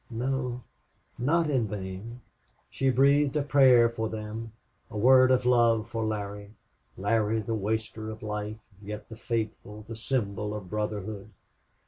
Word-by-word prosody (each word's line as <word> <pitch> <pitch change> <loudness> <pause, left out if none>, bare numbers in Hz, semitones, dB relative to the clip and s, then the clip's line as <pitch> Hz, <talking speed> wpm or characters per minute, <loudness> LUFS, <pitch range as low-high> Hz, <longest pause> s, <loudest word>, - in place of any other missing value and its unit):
No 125 +1 -2 0.6
not 160 +6 +2
in 125 -5 +1
vain! 100 +4 -6 0.5
She 135 - +1
breathed 140 +2 +4
a 150 - +2
prayer 130 -5 +6
for 110 -1 -3
them 110 +1 -6 0.4
a 105 - -7
word 130 +3 +6
of 130 -1 +3
love 115 -3 +4
for 115 -1 -2
Larry. 105 -1 -4 0.4
Larry, 110 +2 +1
the 110 +1 -3
waster 110 +1 -2
of 110 0 -8
life, 105 0 -4 0.2
yet 105 +1 -7
the 110 - -8
faithful, 110 -2 -4
the 115 - -6
symbol 105 -3 -2
of 95 -4 -8
brotherhood. 105 -1 -3
110 Hz, 140 wpm, -28 LUFS, 105-125 Hz, 0.6 s, prayer